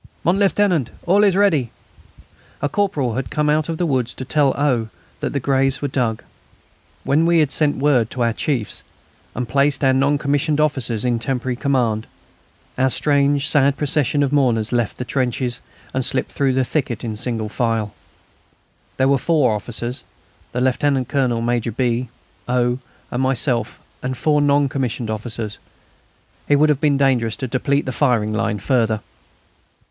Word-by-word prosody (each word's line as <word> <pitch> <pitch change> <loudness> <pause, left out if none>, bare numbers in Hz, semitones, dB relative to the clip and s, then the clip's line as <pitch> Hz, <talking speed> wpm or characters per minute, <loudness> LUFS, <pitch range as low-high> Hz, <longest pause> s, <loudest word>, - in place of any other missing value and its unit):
"Mon 180 +4 +2
Lieutenant, 195 - +2
it's - - -21
all 195 +4 +4
ready." 195 - +3 0.9
A 145 - 0
corporal 145 - 0
had 130 +2 -3
come 150 -1 +1
out 155 +1 0
of 165 - -2
the 175 - 0
wood 130 -6 0
to 130 +1 -7
tell 145 0 +3
O. 125 -6 +1 0.3
that - - -2
the 140 - -1
graves 135 0 +1
were 145 - -2
dug. 120 -5 -1 0.8
When 155 +4 +2
we 170 0 +4
had 150 -4 +2
sent 150 -1 +1
word 130 -6 +2
to 125 - -2
our 115 -1 +1
chiefs, 120 -5 -2 0.5
and 125 +1 -3
placed 140 +2 +1
our 135 -1 +4
non 140 +2 +2
commissioned 145 +2 0
officers 130 -7 +1
in 120 -2 +1
temporary 125 +1 -2
command, 120 -5 0 0.7
our 130 +1 +3
strange, 140 +1 +2
sad 140 -2 +3
procession 145 -1 +1
of 140 0 -1
mourners 120 -6 +2
left 120 -3 -1
the 125 - -4
trenches 125 -1 -1 0.3
and 130 - 0
slipped 130 +1 0
through 135 -2 +1
the 130 0 +1
thicket 125 -6 -2
in 110 -2 -3
single 110 -1 -2
file. 115 -2 -1 1.0
There 130 - +3
were 140 -1 +3
four 145 -6 +2
officers, 120 +4 -4 0.5
the 125 - -2
Lieutenant 130 0 +1
Colonel, 125 -4 0
Major 120 0 -1
B., 120 +1 -1 0.4
O., 125 0 +1 0.3
and 125 - -1
myself 125 -3 0 0.2
and 130 0 -3
four 150 +1 +2
non 145 0 +3
commissioned 125 -4 -3
officers. 110 -1 -5 0.9
It 145 - +5
would 150 +2 +4
have 145 -2 +1
been 145 -3 +3
dangerous 125 -5 +2
to 130 - -4
deplete 140 +4 0
the 130 - -2
firing 120 -6 +1
line 110 -1 -1
further. 110 -2 0
130 Hz, 165 wpm, -20 LUFS, 120-145 Hz, 1.0 s, It